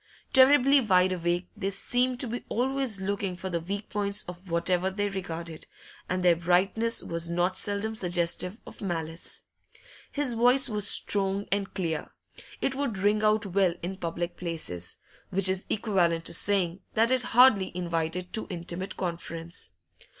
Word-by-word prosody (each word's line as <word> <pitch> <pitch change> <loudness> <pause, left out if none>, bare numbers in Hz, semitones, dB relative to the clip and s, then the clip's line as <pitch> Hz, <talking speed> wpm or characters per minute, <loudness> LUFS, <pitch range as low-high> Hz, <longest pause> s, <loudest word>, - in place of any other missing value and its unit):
Terribly 275 +1 +6
wide 185 -4 +3
awake, 175 0 -1
they 195 - -2
seemed 250 +5 +1
to 255 - 0
be 240 +2 -4
always 260 -3 0
looking 195 -1 -2
for 185 +1 -5
the 170 - 0
weak 200 +5 -5
points 205 0 -1
of 180 +1 -10
whatever 180 +2 +1
they 205 +1 -1
regarded, 170 -4 -6 0.4
and 185 0 -1
their 175 -1 +5
brightness 185 +7 +1
was 170 0 -3
not 175 +2 0
seldom 205 +3 +1
suggestive 180 0 -1
of - - -12
malice. 165 -3 -4 0.7
His 285 -4 0
voice 245 +3 +4
was 210 -3 0
strong 200 0 +2
and 200 0 0
clear; 165 -5 -2 0.5
it 270 - +1
would 270 -6 -2
ring 205 +2 +2
out 215 0 +3
well 190 -2 +2
in 185 +2 -3
public 170 -1 -4
places, 155 - -5 0.3
which 195 0 0
is 190 0 0
equivalent 175 -6 +1
to - - -4
saying 185 -1 +1 0.2
that 230 +2 +3
it 260 -1 +3
hardly 240 -5 +5
invited 170 0 -2
too 220 - -1
intimate 180 +1 -5
conference. 170 -1 -5
190 Hz, 155 wpm, -28 LUFS, 175-215 Hz, 0.7 s, Terribly